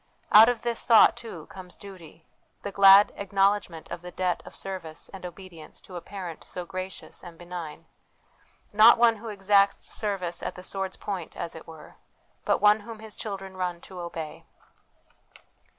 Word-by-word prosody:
Out 220 +3 +9
of 245 -2 -2
this 235 -1 -2
thought, 230 -2 +6
too, 170 -9 -9
comes 185 -1 -9
duty 170 -5 -13 0.4
the 200 - -4
glad 195 +1 +7
acknowledgment 195 -4 0
of - - -5
the 180 - -8
debt 180 0 -1
of - - -11
service 185 -5 -6
and 195 - -11
obedience 175 -3 -12
to 185 - -13
a 175 - -5
Parent 180 -5 -8
so 180 - -7
gracious 185 0 -7
and 175 -2 -11
benign 175 -3 -8 0.9
not 220 +3 +8
One 230 -1 +4
who 230 +2 -10
exacts 200 -1 +2
service 190 -5 -3
at - - -4
the 180 - -10
sword's 190 0 -4
point, 190 -5 -6
as 170 - -4
it 160 - -11
were, 160 -2 -13 0.5
but - - +2
One 210 +1 +6
whom 225 +1 -9
His 220 -1 -9
children 195 -3 -6
run 180 -2 -3
to 185 -2 -11
obey. 165 -3 -7
190 Hz, 165 wpm, -27 LUFS, 175-205 Hz, 0.9 s, Out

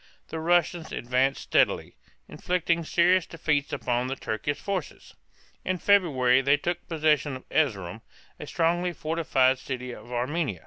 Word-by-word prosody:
The 160 - -4
Russians 170 0 +1
advanced 130 +3 0
steadily, - - +1 0.3
inflicting 170 -2 -1
serious 175 +2 +3
defeats 150 -3 -1
upon 120 -1 -1
the 135 - -3
Turkish 125 +4 -3
forces. 190 -6 -5 0.5
In 185 0 -1
February 140 -11 +3
they 140 +2 +3
took 175 +4 -4
possession 150 -3 +1
of 130 - -11
Erz´erum, 110 - -1 0.4
a - - -8
strongly 175 +2 0
fortified 145 -5 +1
city 125 -1 -5
of 120 - -11
Armenia. 125 - -2
145 Hz, 135 wpm, -26 LUFS, 130-170 Hz, 0.5 s, serious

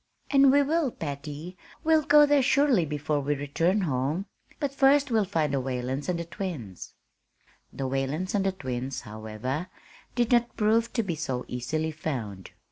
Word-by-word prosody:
"And 275 -1 +6
we 285 +1 +5
will, 310 0 +1
Patty; 150 - -6 0.3
we'll 315 0 +4
go 295 0 +6
there 290 -1 +4
surely 265 - +3
before 150 0 -1
we 145 +1 0
return 165 +8 0
home. 150 +3 -1 0.3
But 285 -3 -2
first 275 0 +4
we'll 220 -3 +3
find 160 -6 0
the 135 - +1
Whalens 130 +3 -3
and 180 - 0
the 170 - -4
twins." 165 - -6 0.8
The 135 - -3
Whalens 135 +7 -2
and 200 -2 +2
the 195 - +1
twins, 130 -6 -4
however, 110 - -5 0.5
did 240 -1 +1
not 240 -1 +2
prove 225 +2 +2
to 230 - +1
be 185 -4 -2
so 135 -6 -3
easily 155 +6 -2
found. 120 -12 -5
160 Hz, 165 wpm, -27 LUFS, -, 0.8 s, And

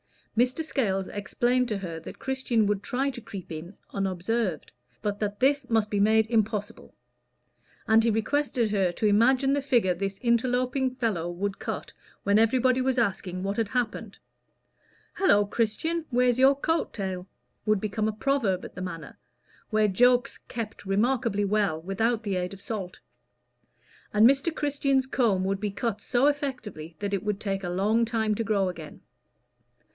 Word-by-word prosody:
Mr. 250 +7 +2
Scales 195 -11 -1
explained 240 +5 0
to 215 -3 -1
her 170 -4 -5
that - - -10
Christian 260 -4 0
would 205 -1 0
try 270 +6 -1
to 240 - -9
creep 200 -6 -9
in 165 +5 -7 0.2
unobserved, 195 -1 -1 0.3
but 205 -1 -2
that 205 -1 -3
this 275 0 +2
must 220 -2 +1
be 205 - +1
made 220 +2 +4
impossible; 220 -1 -2 0.9
and 225 0 +5
he 235 - +3
requested 235 0 0
her 195 -4 +2
to 215 - -2
imagine 255 +6 +4
the 285 - +1
figure 240 -9 +2
this 195 +2 -3
interloping 250 +2 +1
fellow 210 -10 -1
would 195 +3 -3
cut - - -5 0.3
when 200 +1 +4
everybody 255 +3 +3
was 260 0 0
asking 190 -5 -1
what 200 +1 -2
had 225 -2 +1
happened. 240 0 -3 1.0
"Hallo, 205 - +4
Christian! 240 +11 -1
where's 250 -1 +2
your 270 +1 +6
coat 325 +4 -1
tail?" 190 -3 -4 0.4
would 215 -2 +3
become 215 0 -1
a - - +1
proverb 220 -6 0
at - - -10
the 185 - -7
Manor, 165 -6 -7 0.5
where 215 -1 +3
jokes 245 +5 +3
kept 230 -4 -6
remarkably 215 +1 +1
well 200 -5 +1
without 220 +7 -1
the 200 -3 -1
aid 180 +1 -3
of 195 - -11
salt; 200 -3 -5 1.1
and 210 +1 +6
Mr. 275 +5 +2
Christian's 275 -2 +1
comb 225 -8 +1
would 195 +1 -1
be 210 0 -1
cut 205 +1 -3
so 245 +5 +1
effectually 250 - -2
that 205 -1 -3
it 195 - -1
would 210 -1 -1
take 195 -2 -3
a 175 - -2
long 205 +6 +2
time 225 -2 0
to 230 - -1
grow 205 -3 +1
again. 165 -4 -8
215 Hz, 165 wpm, -27 LUFS, 195-250 Hz, 1.1 s, your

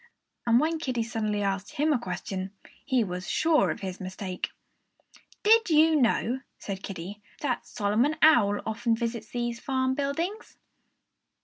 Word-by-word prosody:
And 235 +1 +6
when 320 +3 0
Kiddie 255 -7 -1
suddenly 215 -3 -1
asked 195 0 -2
him 300 +2 +2
a 260 - +1
question, 190 -1 -5 0.3
he 260 -4 +2
was 180 -2 -5
sure 320 -2 +3
of - - -3
his 190 -2 -5
mistake. 185 0 -4 0.9
"Did 445 -1 +5
you 315 0 +5
know," 250 -1 +2 0.2
said 195 -2 -6
Kiddie, 195 +2 -7 0.2
"that 260 -5 -2
Solomon 230 +7 +1
Owl 210 -10 +5
often 225 +1 0
visits 230 -1 -3
these 240 -1 -3
farm 260 -1 0
buildings?" 325 +10 -3
235 Hz, 140 wpm, -27 LUFS, 200-285 Hz, 0.9 s, And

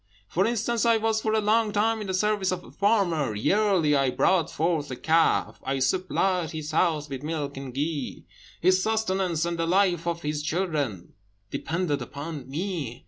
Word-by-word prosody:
For 190 - +1
instance, 235 0 0
I 230 -1 +4
was 220 0 0
for 220 0 0
a - - +3
long 215 +1 +2
time 220 +2 +1
in 205 - -5
the 190 - -1
service 205 -1 +1
of 180 -1 -3
a - - -14
farmer; 175 - +1
yearly 185 - +2
I 135 -1 +2
brought 170 +5 +2
forth 160 -2 -1
a 130 - -4
calf; 160 +5 +2
I 135 +1 -1
supplied 180 +4 0
his 155 -2 -5
house 155 -2 +1
with 135 -2 -6
milk 150 -2 -3
and 135 -1 -6
ghee; 145 +1 -3 0.3
his 185 +2 +3
sustenance, 190 -6 0
and 170 -1 -3
the 165 - 0
life 180 -2 +2
of 170 0 -2
his 150 0 -2
children, 150 - -2 0.4
depended 165 -3 -1
upon 145 -2 -7
me. 150 - -4
170 Hz, 180 wpm, -26 LUFS, 150-195 Hz, 0.4 s, I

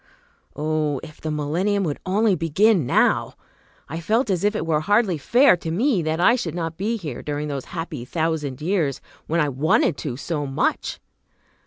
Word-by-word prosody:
Oh, 150 -2 -1
if 155 - -12
the 155 - -3
millennium 170 +7 0
would 150 -5 -2
only 205 +2 +3
begin 175 - +2
now! - - +2 0.5
I 160 - -5
felt 220 +6 +1
as 180 -1 0
if 205 +1 +2
it 165 - -2
were 160 -2 +1
hardly 200 0 +2
fair 245 - +5
to 165 - -6
me 210 - +1
that 160 +1 -1
I 235 +7 +5
should 250 -7 -3
not 165 -2 -3
be 215 +6 -1
here 150 - -6
during 150 0 -3
those 140 -2 -4
happy 165 -6 -5
thousand 155 -2 -2
years, 160 -7 0 0.3
when 165 +2 +1
I 150 - +2
wanted 140 +1 +2
to 130 -5 -4
so 145 0 -3
much. 135 - -1
165 Hz, 180 wpm, -23 LUFS, 150-195 Hz, 0.5 s, fair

